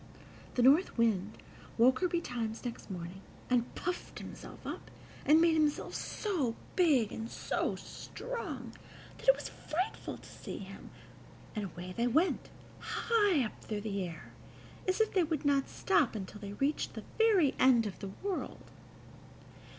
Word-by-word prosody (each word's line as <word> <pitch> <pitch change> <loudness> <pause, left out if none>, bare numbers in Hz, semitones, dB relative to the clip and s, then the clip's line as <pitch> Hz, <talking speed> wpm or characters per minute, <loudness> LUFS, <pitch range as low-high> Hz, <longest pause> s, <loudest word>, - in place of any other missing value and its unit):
The 245 - +3
North 285 +7 +5
Wind 215 -3 +2 0.4
woke 255 +3 +6
her 365 - +3
betimes 245 -10 -2
next 235 -2 -5
morning, 180 0 -6 0.3
and 245 -1 +2
puffed 355 0 -3
himself - - -9
up, - - -5 0.4
and 305 +3 +8
made 335 0 +5
himself 305 -2 +1
so 315 - -1 0.2
big 285 - +4
and 225 +1 -5
so - - -1
strong - - -6 0.5
that - - -10
it - - +9
was - - -6
frightful 365 +7 -3
to - - -14
see - - -7
him, - - -9 0.7
and 210 -2 -1
away 180 0 -7
they 235 +1 +2
went, 315 +10 +2 0.3
high 410 - +2
up 215 - -8
through 210 -2 -3
the 200 -2 -2
air, 170 -2 -8 0.5
as 370 +2 +2
if 440 - +2
they 370 - +4
would 315 -2 -2
not 280 -1 +3
stop 305 -11 +2
until 210 0 -6
they 200 - -5
had 200 - -9
reached 285 +3 +1
the - - -5 0.2
very 405 -11 +5
end 250 -3 +6
of 205 - -5
the 195 - -5
world. 395 -2 -4
260 Hz, 160 wpm, -33 LUFS, 215-345 Hz, 0.7 s, it